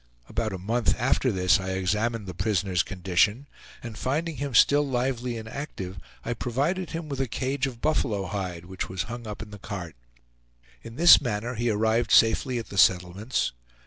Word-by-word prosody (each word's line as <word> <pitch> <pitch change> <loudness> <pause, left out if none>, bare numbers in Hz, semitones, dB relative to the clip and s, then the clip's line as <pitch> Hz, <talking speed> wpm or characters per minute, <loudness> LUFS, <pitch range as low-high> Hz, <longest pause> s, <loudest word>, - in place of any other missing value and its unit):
About 115 -1 -2
a 95 - -4
month 115 +6 0
after 130 +1 +2
this 90 -3 +3
I 95 0 -3
examined 105 +4 -1
the 90 - -6
prisoner's 95 -2 0
condition, 95 - +1 0.4
and 115 -3 -7
finding 155 +4 -2
him 140 -3 -3
still 145 +6 +6
lively 125 -2 -2
and 110 0 -7
active, 95 - -6 0.3
I 120 - -1
provided 140 - -1
him 165 -1 -5
with 140 -2 -3
a 135 - 0
cage 130 +4 -1
of 120 -3 -8
buffalo 110 -10 0
hide, 90 -2 -4
which 95 +1 -5
was 95 -1 -2
hung 120 -1 -7
up 105 0 -6
in 105 - -12
the 105 - -10
cart. 90 -6 -7 0.9
In 115 0 -10
this 170 +5 +8
manner 120 -1 -2
he 120 0 -1
arrived 110 +2 +1
safely 115 +3 +4
at 115 - -5
the 100 - -2
settlements. 95 +6 +2
115 Hz, 180 wpm, -26 LUFS, 95-130 Hz, 0.9 s, this